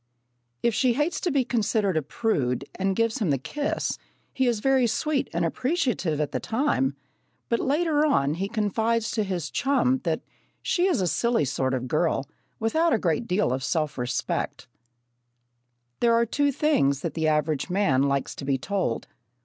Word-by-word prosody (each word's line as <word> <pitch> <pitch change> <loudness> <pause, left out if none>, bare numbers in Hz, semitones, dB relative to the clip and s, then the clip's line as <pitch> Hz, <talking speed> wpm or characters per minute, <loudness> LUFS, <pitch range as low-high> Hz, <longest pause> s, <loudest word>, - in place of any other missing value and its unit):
If 235 - +3
she 250 +2 +3
hates 295 +7 -1
to 360 - 0
be 275 -5 +1
considered 215 -5 +1
a 155 - +2
prude 140 - -1
and 195 0 -1
gives 230 +4 +1
him 205 -7 0
the 140 - +2
kiss, 290 - -2 0.3
he 260 -1 +1
is 235 -3 +1
very 265 +1 +3
sweet 280 +5 0
and 170 0 0
appreciative 245 - 0
at 150 -2 -1
the - - -1
time, 220 - 0 0.5
but 235 - +1
later 300 +1 +2
on 150 - +2
he 190 +5 -3
confides 220 +1 0
to 220 - 0
his 180 -5 -3
chum 265 -1 +2
that 165 -6 -1 0.4
she 360 0 +2
is 345 - +1
a 180 - +1
silly 230 +3 +1
sort 130 -1 0
of 125 - -3
a - - -4
girl, 155 0 0 0.3
without 320 +9 +2
a - - +4
great 180 +3 0
deal 185 -7 +1
of 130 0 -3
self 155 -1 -1
respect! 125 0 -3 1.3
There 235 -1 +4
are 235 0 +3
two 285 +5 +1
things 145 - +2
that 165 - -3
the 160 0 0
average 150 +1 0
man 180 -9 +2
likes 140 -1 0
to - - -6
be 135 -1 +1
told. 180 - -2
205 Hz, 180 wpm, -26 LUFS, 150-250 Hz, 1.3 s, a